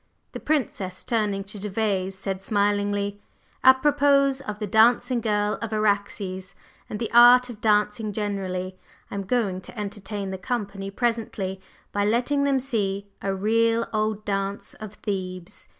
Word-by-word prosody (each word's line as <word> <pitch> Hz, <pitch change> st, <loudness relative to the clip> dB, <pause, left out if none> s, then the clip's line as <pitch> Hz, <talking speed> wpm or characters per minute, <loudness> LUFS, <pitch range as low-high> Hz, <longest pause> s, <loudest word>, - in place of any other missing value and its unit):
The -, -, -6 dB
Princess, 205 Hz, -11 st, -2 dB
turning 210 Hz, -4 st, 0 dB
to 205 Hz, +1 st, -8 dB
Gervase, 195 Hz, -2 st, -1 dB
said 190 Hz, 0 st, -4 dB
smilingly: 205 Hz, 0 st, 0 dB, 0.4 s
"Apropos 275 Hz, 0 st, +5 dB
of 210 Hz, -1 st, -3 dB
the 210 Hz, -, -3 dB
dancing 235 Hz, +4 st, +4 dB
girl 210 Hz, -1 st, 0 dB
of 230 Hz, -1 st, -4 dB
Araxes 200 Hz, -3 st, -1 dB, 0.3 s
and 210 Hz, -, -4 dB
the 230 Hz, -, -3 dB
art 245 Hz, +1 st, +8 dB
of 220 Hz, -2 st, -12 dB
dancing 210 Hz, 0 st, +2 dB
generally, 190 Hz, -3 st, -3 dB, 0.3 s
I -, -, -7 dB
am 200 Hz, -1 st, -3 dB
going 200 Hz, -5 st, 0 dB
to 210 Hz, +5 st, -9 dB
entertain 200 Hz, -1 st, -4 dB
the 190 Hz, -, -5 dB
company 195 Hz, -2 st, -3 dB
presently 210 Hz, -4 st, -2 dB, 0.3 s
by 205 Hz, -, 0 dB
letting 245 Hz, +7 st, +1 dB
them 275 Hz, -1 st, +2 dB
see 205 Hz, -7 st, -1 dB, 0.2 s
a 195 Hz, -, -1 dB
real 230 Hz, +3 st, +2 dB
old 215 Hz, 0 st, -1 dB
dance 195 Hz, 0 st, -3 dB
of 215 Hz, -1 st, -8 dB
Thebes. 185 Hz, -1 st, -5 dB
210 Hz, 145 wpm, -25 LUFS, 195-230 Hz, 0.4 s, art